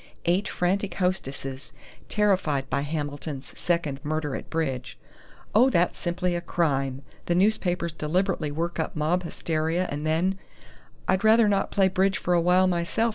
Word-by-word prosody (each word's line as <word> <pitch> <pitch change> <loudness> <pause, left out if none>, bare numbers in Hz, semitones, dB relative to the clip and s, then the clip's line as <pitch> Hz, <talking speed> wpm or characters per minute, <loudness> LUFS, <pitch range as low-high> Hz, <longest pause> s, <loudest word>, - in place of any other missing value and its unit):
Eight 180 +4 +2
frantic 195 +3 -1
hostesses, 140 -8 -2 0.4
terrified 185 -10 +1
by - - +1
Hamilton's 145 -1 -4
second 170 -6 -1
murder 150 -2 -2
at - - -7
bridge 135 -6 -3 0.3
' - - -25
Oh, 245 +5 +6
that's 175 -7 +1
simply 175 0 -1
a 175 - -2
crime! 140 -6 -1 0.2
The 175 - +2
newspapers 180 -4 +1
deliberately 165 +1 0
work 170 +3 -3
up 160 - -2
mob 160 +4 +1
hysteria 165 +1 -1
and 145 +1 -3
then 170 +5 +1 0.3
" - - -27
"I'd 190 - +2
rather 220 0 +6
not 200 -1 +1
play 195 -1 +3
bridge 190 +1 +1
for 180 - 0
a 170 - +4
while 180 +2 +4
myself!" 180 +6 +1
170 Hz, 160 wpm, -26 LUFS, 150-185 Hz, 0.4 s, Oh